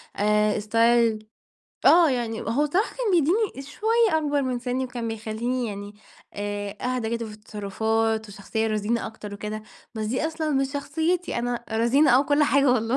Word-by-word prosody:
آآ 210 +1 +2
ستايل 230 0 +2 0.6
آه، 335 -3 +7
يعني 235 -3 -2
هو 230 +7 0
الصراحة 360 +10 0
كان - - 0
بيدّيني 350 -1 +1
شوية 445 -5 +2
أكبر 290 -2 0
من 255 -2 -1
سنّي، 250 +1 -2
وكان 245 -2 -5
بيخلّيني 225 +3 -2
يعني 205 -1 -7 0.4
آآ 205 0 -4
أهدى 250 -3 -2
كده 230 0 -5
في 215 - -9
التصرفات، 220 +1 -1
وشخصية 205 +2 -3
رزينة 215 +2 -1
أكتر 210 -2 -8
وكده، 210 +1 -5 0.3
بس 215 -1 -3
دي 255 +8 0
أصلًا 315 -1 -3
مش 270 -1 0
شخصيتي. 320 +4 -1
أنا 240 0 -2
رزينة 240 +6 +4
آه 255 - +6
وكل 290 +2 +2
حاجة 280 -2 +4
والله، 230 0 +1
235 Hz, 160 wpm, -25 LUFS, 215-285 Hz, 0.6 s, آه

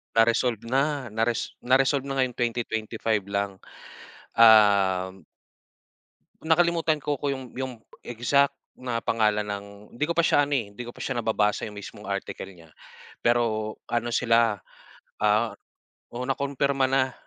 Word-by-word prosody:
Na-resolve 115 0 +3
na, 135 0 0
na 110 +1 0
res 120 -1 -3
na-resolve 135 +2 +3
na 140 - -4
ngayong 125 -2 -1
2025 110 -3 -1
lang, 100 -1 -2 0.8
um 100 -4 +5 1.2
Nakalimutan 165 -1 +2
ko 145 -2 -1
ko 145 - 0
yung 130 -3 -5
yung 130 0 -4 0.3
exact 135 +4 +1 0.2
na 125 -2 -4
pangalan 105 -2 +1
ng 100 -1 -5 0.3
hindi 135 +5 -1
ko 170 - -2
pa 170 - +4
siya 145 - +4
ano, - - -1
eh, 115 - -2
hindi 105 - -8
ko 120 - -7
pa - - -13
siya 130 -3 -2
nababasa 105 -1 0
yung 105 - -12
mismong 100 -1 -9
article 100 0 -4
niya, 85 -4 -17 0.5
pero 110 -2 +1
ano 120 0 -1
sila, 115 -2 +2 0.6
ah 105 +2 +2 0.6
oo 125 +1 -4
na 135 - +2
kumpirma 140 -1 0
na, 130 -1 +1
120 Hz, 145 wpm, -26 LUFS, 105-130 Hz, 1.2 s, um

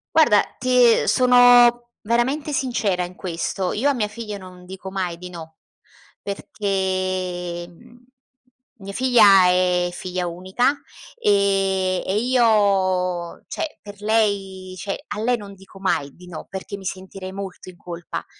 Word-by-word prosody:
Guarda, 240 -11 +6 0.2
ti 250 -2 +4
sono 245 -1 +5
veramente 250 +7 0
sincera 240 -9 0
in 175 - -10
questo: 180 +1 -3
io 265 +7 +1
a - - +2
mia 225 -5 -1
figlia 210 -1 -7
non 180 -1 -13
dico 190 +1 -8
mai 185 -3 -3
di 180 0 -8
no. 160 -2 -10 0.6
Perché, 185 -3 -3
mhmm, 240 +7 -19 0.7
mia 195 0 -8
figlia 215 -6 +6
è 180 -1 +2
figlia 180 0 -4
unica, 185 +10 0 0.4
e 195 - +1
e 190 - -1
io 195 -7 +1
cioè 315 - -5
per 205 0 -11
lei 200 -4 -1
cioè 195 +3 -5
a 210 - -4
lei 245 +2 +1
non 200 -2 -10
dico 195 0 -16
mai 185 -7 0
di 180 0 -15
no, 170 -3 -9
perché 195 +1 -6
mi 195 - -12
sentirei 190 0 -6
molto 190 -1 -8
in 180 - -14
colpa. 175 0 -7
195 Hz, 140 wpm, -22 LUFS, 185-230 Hz, 0.7 s, Guarda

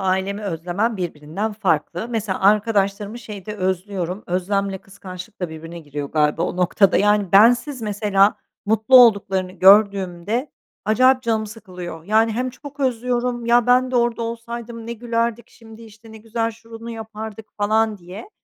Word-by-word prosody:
ailemi 190 +2 -1
özlemem 190 +5 -2
birbirinden 175 +4 -4
farklı. 180 -1 -1
Mesela 215 -5 -2
arkadaşlarımı 205 +1 +1
şeyde 210 -2 -8
özlüyorum, 185 0 -3
özlemle 195 +2 -1
kıskançlıkla 185 -1 -8
birbirine 165 +2 -9
giriyor 145 -2 -6
galiba 150 +1 +1
o - - -2
noktada. 185 +2 +3
Yani, 205 -2 +2
bensiz 240 +6 +4
mesela 205 -1 +2 0.3
mutlu 220 +4 +4
olduklarını 195 -6 +4
gördüğümde 195 - +3 0.3
acayip 255 +4 +4
canım 220 -2 0
sıkılıyor. 180 -6 -9
Yani, 220 +3 +2
hem 250 +3 -2
çok 285 +2 -12
özlüyorum, 245 -1 -1
ya 240 0 +4
ben 250 +1 +4
de 255 - 0
orada 235 -1 +1
olsaydım 230 0 -6
ne 235 - -4
gülerdik 235 0 -2
şimdi, 225 -1 -15
işte, 220 0 -15
ne - - -10
güzel 225 +1 -2
şunu 230 +1 -11
yapardık 220 -1 -8
falan 215 +1 +1
diye. 185 - -11
210 Hz, 140 wpm, -21 LUFS, 190-230 Hz, 0.3 s, bensiz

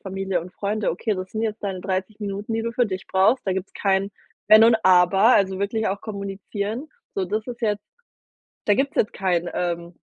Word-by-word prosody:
Familie 195 -1 -2
und 180 +2 -10
Freunde, 210 +1 -1
okay, 210 +6 -1
das 185 0 -6
sind 220 - -2
jetzt 220 -1 -3
deine 190 -2 -3
30 190 +3 -3
Minuten, 205 +2 -4
die 225 - -1
du 230 0 -3
für 245 -1 +2
dich 190 -1 -5
brauchst. 195 +6 +2
Da 190 - +1
gibt's 190 +1 -4
kein 195 0 +1 0.4
Wenn 215 +1 +8
und 230 0 +6
Aber, 185 +5 +6
also, 190 -1 +2
wirklich 220 +2 -1
auch 195 +1 -3
kommunizieren. 200 +5 -5 0.3
So, 195 - 0
das 215 +4 -2
ist 240 -1 -7
jetzt 210 -2 0 0.8
da 205 - +4
gibt's 275 +4 0
jetzt 210 - +2
kein, 175 -3 0
ähm, 170 -1 -3
200 Hz, 200 wpm, -23 LUFS, 190-220 Hz, 0.8 s, Wenn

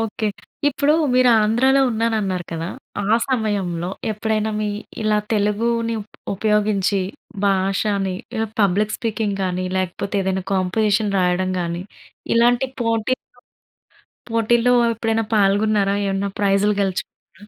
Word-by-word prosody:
Okay. 220 -1 -2 0.4
ఇప్పుడు, 285 +2 +2 0.2
మీరు 255 0 +5
ఆంధ్రాలో 260 +6 +3
ఉన్నాను 225 0 0
అన్నారు 185 -3 -2
కదా! 165 +1 -3 0.4
ఆ 220 +3 +4
సమయంలో, 195 -8 -1 0.2
ఎప్పుడైనా 215 0 -1
మీ 210 - -1 0.3
ఇలా 215 0 +2
తెలుగుని 230 +3 +1
ఉ - - -16 0.3
ఉపయోగించి, 210 -1 +1 0.5
భాషని 195 0 +1 0.2
ఇలా 225 0 0
పబ్లిక్ 205 +2 +2
స్పీకింగ్ 215 -3 -2
కానీ, 185 0 -1
లేకపోతే 185 +2 -3
ఏదైనా 190 -1 -1
కాంపోజిషన్ 205 +2 +1
రాయడం 180 +1 +1
గానీ, 170 +1 -3 0.5
ఇలాంటి 240 +2 +3
పోటీల్లో, 230 +2 0 1.1
పోటీల్లో 235 +2 +3 0.2
ఎప్పుడైనా 225 0 -1
పాల్గొన్నారా? 200 0 +2
ఏమన్నా 195 +1 -1
ప్రైజ్‌లు 200 +1 +2
గెలుచుకున్నారా? 195 +1 -5
210 Hz, 115 wpm, -21 LUFS, 195-225 Hz, 1.1 s, మీరు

